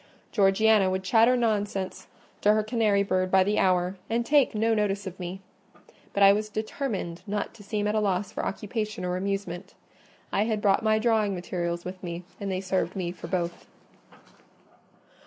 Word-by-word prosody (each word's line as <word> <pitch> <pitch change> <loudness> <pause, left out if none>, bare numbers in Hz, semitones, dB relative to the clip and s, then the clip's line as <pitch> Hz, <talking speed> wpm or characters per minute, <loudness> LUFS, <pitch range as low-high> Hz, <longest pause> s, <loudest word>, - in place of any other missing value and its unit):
Georgiana 205 0 +4
would 190 0 -2
chatter 230 +5 +4
nonsense 205 -5 -1 0.3
to 210 - +5
her 215 0 +2
canary 215 -3 +2
bird 185 -1 0
by 190 0 +5
the 205 +2 +1
hour, 185 0 +2
and 235 +1 0
take 285 -3 +3
no 225 +1 +2
notice 205 -2 0
of 190 -1 -7
me. 180 +2 -6 0.7
But 200 - +2
I 195 0 +8
was 215 +1 -2
determined 215 -5 -4
not 205 0 -2
to 210 - -14
seem 205 +1 -2
at 210 - +1
a 215 - +2
loss 195 -2 0
for - - -4
occupation 210 -1 -3
or 180 0 -1
amusement: 195 -2 -4 0.6
I 205 - +2
had 220 -2 0
brought 200 -2 +3
my 215 -1 +3
drawing 220 -3 +2
materials 175 -1 -3
with 185 0 -7
me, 175 0 -5 0.2
and 200 -1 -3
they 185 0 -2
served 185 -2 -1
me 180 -3 -2
for 175 - -9
both. 175 -1 -3
200 Hz, 175 wpm, -27 LUFS, 185-215 Hz, 0.7 s, I